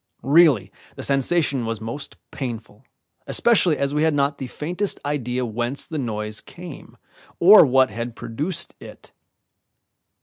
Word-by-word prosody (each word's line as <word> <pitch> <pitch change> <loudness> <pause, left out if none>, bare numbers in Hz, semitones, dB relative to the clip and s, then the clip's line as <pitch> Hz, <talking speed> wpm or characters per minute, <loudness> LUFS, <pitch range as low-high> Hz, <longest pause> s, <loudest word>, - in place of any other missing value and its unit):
Really, 140 - +4 0.2
the - - -7
sensation 140 -1 +1
was 115 -1 -3
most 115 +6 -7 0.2
painful, 115 -6 -7 0.4
especially 190 -9 +3
as 140 0 -1
we 150 - +1
had 160 -1 +2
not 140 0 0
the 130 - -4
faintest 180 +10 -3
idea 130 -3 -2
whence 120 +4 -3
the 155 - -5
noise 105 -3 -4
came 175 -4 -11 0.4
or 200 +5 +9
what 130 -2 +3
had 115 +2 -5
produced 155 +9 -4
it. - - -13
135 Hz, 135 wpm, -22 LUFS, 115-155 Hz, 0.4 s, or